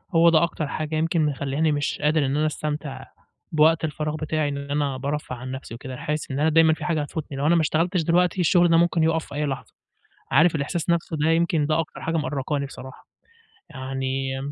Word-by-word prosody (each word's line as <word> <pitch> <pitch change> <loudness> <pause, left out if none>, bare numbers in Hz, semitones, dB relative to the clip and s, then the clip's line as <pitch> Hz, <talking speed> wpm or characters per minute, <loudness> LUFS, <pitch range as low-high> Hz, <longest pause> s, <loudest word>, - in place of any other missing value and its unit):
هو 170 +1 +7
ده 165 0 +4
أكتر 160 -3 -2
حاجة 155 +1 -3
يمكن 160 0 +1
مخلّياني 145 +2 0
مش 145 -1 -1
قادر 150 0 +2
إن 135 +2 0
أنا 155 - +2
أستمتع 150 -3 -4 0.5
بوقت 160 +1 +4
الفراغ 150 0 -3
بتاعي، 155 -1 -1
إن 140 - -4
أنا 145 -2 0
بارفّه 140 0 -3
عن 125 +1 -7
نَفْسي 130 -3 -7
وكده، 130 +1 -8
حاسس 150 0 -3
إن 135 - -2
أنا 155 +2 +3
دايمًا 160 0 +5
في - - -6
حاجة 160 -4 0
هتفوتني 145 -1 -5
لو 145 - 0
أنا 170 - +5
ما 165 - +4
اشتغلتش 170 +3 +1
دلوقتي، 180 +3 +2
الشغل 175 +1 +4
ده 165 - +5
ممكن 170 -1 +3
يقف 160 0 +1
في 145 - -10
أي 150 0 0
لحظة، 135 -1 -5 0.6
عارف 160 +5 +5
الإحساس 160 +4 -2
نَفْسُه 165 -2 0
ده، 155 +2 +1
يمكن 165 -2 +2
ده 155 +2 +1
أكتر 160 - -5
حاجة 165 0 -1
مأرقاني 145 -1 -2
بصراحة، 130 -1 -11 0.6
يعني 135 0 -3
155 Hz, 205 wpm, -24 LUFS, 140-165 Hz, 0.6 s, هو